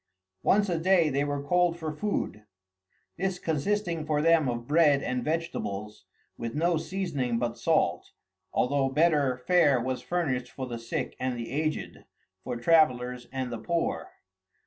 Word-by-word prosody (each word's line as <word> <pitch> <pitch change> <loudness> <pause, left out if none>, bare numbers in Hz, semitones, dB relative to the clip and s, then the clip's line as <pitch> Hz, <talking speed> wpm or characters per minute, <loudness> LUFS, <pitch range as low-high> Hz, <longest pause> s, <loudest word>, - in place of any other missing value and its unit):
] 95 - -62
Once 205 +1 +3
a 170 -3 0
day 175 -2 +4
they 140 +1 +1
were 145 -1 -2
called 175 +2 +2
to 160 -2 -4
food; 150 - -3 0.7
this 190 0 -1
consisting 170 +1 -1
for 150 -1 0
them 160 -3 +4
of 120 -1 -3
bread 150 -2 +4
and 125 -1 -2
vegetables 110 -11 -3 0.3
with 115 +2 -4
no 170 +3 +2
seasoning 155 -9 -2
but 120 0 -1
salt, - - +1 0.4
although 135 +1 +1
better 145 -3 +2
fare 145 -1 +3
was 130 +2 -2
furnished 135 -8 -1
for 130 - -6
the 120 -2 -5
sick 115 - -4
and 130 -1 -2
the 115 0 -6
aged, 155 +2 -3 0.4
for 125 - -4
travellers 125 -4 +2
and 130 -2 -3
the 115 - -4
poor. 170 - -2
145 Hz, 155 wpm, -28 LUFS, 125-170 Hz, 0.7 s, day